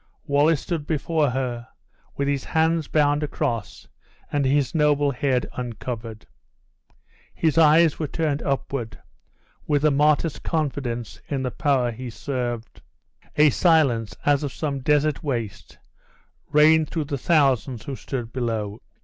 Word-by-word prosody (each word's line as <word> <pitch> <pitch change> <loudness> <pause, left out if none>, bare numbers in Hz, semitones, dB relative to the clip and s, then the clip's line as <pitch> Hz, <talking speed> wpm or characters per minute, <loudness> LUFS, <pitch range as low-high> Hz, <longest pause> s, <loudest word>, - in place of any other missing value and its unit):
Wallace 145 +1 +3
stood 160 -4 -4
before 155 -1 0
her, 125 -2 -3 0.5
with 140 - 0
his 140 -2 0
hands 160 -1 +1
bound 145 -1 +2
across 115 -7 -3 0.4
and 145 -1 +1
his 135 -1 +1
noble 145 -2 +2
head 130 -2 0
uncovered. 115 -2 -6 1.1
His 160 -3 +1
eyes 160 0 +5
were 155 - -1
turned 150 0 -1
upward, 135 -4 -3 0.7
with 145 0 +1
a 155 - +5
martyr's 150 +2 +2
confidence 135 -7 -3
in 135 -2 -2
the 125 - -2
Power 130 -1 +1
he 125 +2 -7
served. 120 -2 -5 0.5
A 150 0 +5
silence, 125 - +2
as 145 -1 +3
of 145 -3 -3
some 140 0 -3
desert 150 +1 +1
waste, 120 -8 -4 0.7
reigned 155 +1 +5
throughout 155 -4 -3
the 140 -3 -2
thousands 135 -6 +2
who 140 - -5
stood 120 -4 -6
below. 110 -4 -3
140 Hz, 130 wpm, -23 LUFS, 125-150 Hz, 1.1 s, eyes